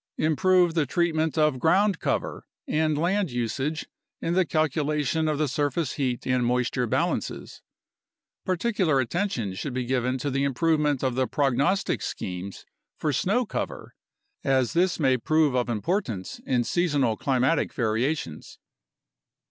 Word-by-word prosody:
Improve 175 +2 +3
the 160 -4 +1
treatment 160 0 0
of 150 -4 +2
ground 190 +5 +3
cover - - -2 0.2
and 155 -1 +1
land 185 +3 +1
usage 130 +5 -2 0.3
in 165 - -1
the 185 -1 +2
calcula 150 -1 0
tion 160 +3 0
of 155 -1 0
the 155 0 +1
surface 145 +2 -1
heat 130 -4 -2
and 125 -1 +1
moisture 125 0 0
balances. - - -2 0.8
Particular 185 -5 +1
attention 130 - -1
should 125 +7 -5
be 130 -1 -1
given 125 0 0
to 140 +2 -3
the 135 +1 0
improvement 150 0 +1
of 130 -2 +1
the 130 +1 0
prognostic 140 +7 +1
schemes 90 +1 -5 0.3
for 150 - -1
snow 215 - +1
cover, - - -5 0.5
as 130 -1 +2
this 175 +1 +2
may 130 -4 +3
prove 155 +3 +2
of 125 -1 0
importance 120 - -2
in 125 -2 +2
seasonal 145 -8 +1
climatic 135 +6 +1
variations. 115 - -2
145 Hz, 140 wpm, -26 LUFS, 125-165 Hz, 0.8 s, Improve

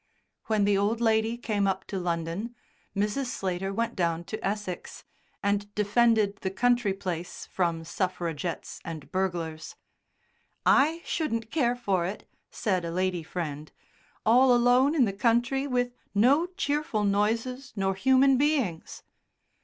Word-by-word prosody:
When 215 -2 +2
the 200 -1 +3
old 215 +3 +1
lady 225 0 +2
came 210 -4 0
up 190 -1 -1
to 195 - -4
London 175 +6 -3 0.4
Mrs. 210 +7 0
Slater 190 -4 -2
went 230 +3 -2
down 170 -2 0
to 215 +5 -7
Essex 200 -2 -4 0.4
and 205 0 0
defended 210 -1 +3
the 190 - -3
country 240 +1 +2
place 180 -3 -5
from 170 -3 -1
suffragettes 175 -2 -3
and 155 -4 -8
burglars. 175 - -3 0.9
"I 320 +4 +4
shouldn't 230 -8 -2
care 245 -6 +2
for 200 -8 0
it," 195 - -7 0.2
said 185 -4 -1
a 170 - -3
lady 180 0 -1
friend, 155 -3 -5 0.5
"all 250 +3 +6
alone 250 +5 +4
in 270 -6 +5
the 200 - -2
country 240 +6 +1
with 245 -2 0 0.2
no 275 - +4
cheerful 295 - -1
noises 225 +6 0
nor 195 -1 0
human 265 +5 +4
beings." 270 - -1
205 Hz, 135 wpm, -27 LUFS, 185-245 Hz, 0.9 s, all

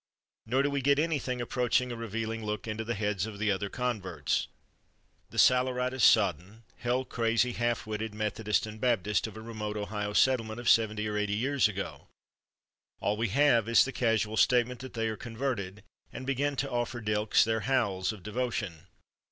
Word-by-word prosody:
Nor 130 +4 +2
do 145 - 0
we 140 -1 -1
get 140 +1 +3
anything 145 -5 -1
approaching 125 0 0
a - - -4
revealing 115 0 -4
look 105 +1 -4
into 110 0 -3
the 120 +1 -3
heads 105 -1 -1
of 105 -2 -8
the 105 0 +1
other 100 +1 -2
converts—the 100 - -5
saleratus 125 0 +3
sodden, 100 +1 +3
hell 125 +2 -1
crazy, 115 0 +1
half 120 0 -1
witted 110 0 -4
Methodists 105 0 0
and 110 0 -9
Baptists 110 -4 +1
of 110 -1 -10
a - - -7
remote 110 -2 -5
Ohio 105 0 -3
settlement 115 -2 +2
of 120 - -6
seventy 110 -2 +3
or 105 0 -2
eighty 105 0 0
years 135 +4 +2
ago. 100 -2 -6 0.9
All 105 - 0
we 115 +2 0
have 120 -2 +3
is 115 - +6
the 130 - -4
casual 110 -3 0
statement 125 0 +3
that 130 -1 -9
they 115 -1 0
are 110 - -2
converted, 110 -5 -4 0.3
and 130 - -7
begin 140 +2 0
to 135 +1 -2
offer 120 0 -2
Dylks 105 -1 +2
their 110 0 0
howls 105 -6 0
of 105 -5 -11
devotion. 105 -7 -3
115 Hz, 175 wpm, -29 LUFS, 105-125 Hz, 0.9 s, is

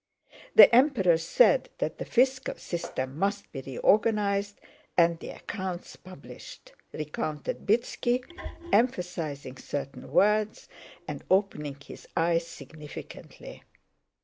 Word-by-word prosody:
The - - +10
Emperor 235 - +4
said - - +3
that - - -3
the - - -4
fiscal 260 +1 +1
system 135 -5 -5
must 200 +1 -1
be 135 - -6
reorganized 200 - +1 0.4
and 170 -1 +4
the - - -8
accounts 185 -4 -6
published," 185 - -13 0.2
recounted 150 0 -5
Bítski, 240 +3 +1 0.5
emphasizing 175 - -1
certain 140 0 -6
words 210 +1 +2 0.4
and - - -6
opening 150 -8 0
his 140 - -12
eyes 165 0 +2
significantly. 150 -2 -11
185 Hz, 100 wpm, -28 LUFS, 155-215 Hz, 0.5 s, The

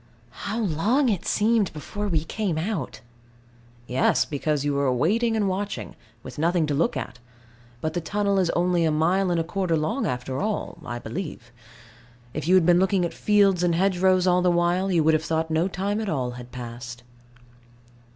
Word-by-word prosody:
How 215 - -2
long 220 - +1
it 195 -6 -2
seemed 215 -2 +2
before 205 +7 -5
we 160 -5 0
came 185 -1 -2
out! 160 - -3 0.8
Yes, 125 +2 +2
because 145 0 -1
you 145 - +1
were 140 -2 +1
waiting 220 - +1
and 210 -2 +1
watching, 185 - -3 0.3
with - - -9
nothing 170 +1 +2
to 150 - -2
look 150 0 +1
at: 125 -1 -6 0.6
but 155 0 -2
the 175 - -2
tunnel 200 +3 0
is 180 -3 +1
only 175 0 +2
a 160 - +3
mile 175 +5 +2
and 175 -1 +1
a - - +1
quarter 175 -1 -1
long 155 0 -1
after 125 +1 -3
all, 210 -4 -3
I 120 -4 -5
believe. 120 -1 -6 0.8
If 155 +1 -4
you 185 - +5
had 185 -3 +5
been 175 0 +5
looking 190 -1 +2
at 170 - -4
fields 200 -4 +3
and 175 -2 +2
hedgerows 185 0 +2
all 180 0 +3
the 180 - +3
while, 175 +2 +1
you 170 -3 +3
would 160 +1 +4
have 155 0 +1
thought 160 0 -1
no 160 +3 +2
time 200 +3 -2
at 215 - -3
all 130 -6 -1
had 125 0 -10
passed. 120 0 -8
175 Hz, 190 wpm, -25 LUFS, 150-195 Hz, 0.8 s, you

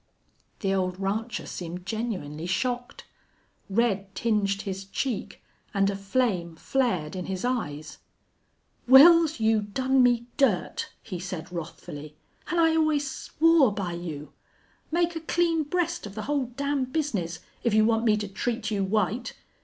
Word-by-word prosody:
The 195 -3 +1
old 185 -1 -1
rancher 215 +4 -2
seemed 180 +1 -6
genuinely 180 -8 -4
shocked. 245 +6 -2 0.6
Red 200 -2 0
tinged 205 -3 0
his 195 0 -5
cheek 225 +3 -4 0.3
and 195 0 +3
a - - -4
flame 195 -4 -1
flared 185 -7 -1
in 185 - -4
his 190 +2 -3
eyes. 155 - -3 0.9
"Wils, 320 +2 +8
you 220 -1 +3
done 260 +6 +1
me 240 -1 +3
dirt," 225 -11 +1
he 185 -5 -6
said, 175 -2 -6
wrathfully. 155 -3 -7 0.3
"An' 345 - 0
I 325 -1 +4
always 310 -3 +2
swore 315 -1 +3
by 195 -4 -3
you.... 160 -4 -6 0.6
Make 340 +1 +1
a - - -2
clean 330 0 +1
breast 345 -2 -1
of 200 - -11
the 215 - -4
whole 280 +1 0
damn 280 +2 -1
bizness, 245 - -2 0.3
if 235 -3 +2
you 215 0 +5
want 225 0 +2
me 215 -2 +4
to 210 -1 -3
treat 220 +2 -3
you 200 -2 0
white. 215 +4 -1
215 Hz, 145 wpm, -27 LUFS, 185-265 Hz, 0.9 s, Wils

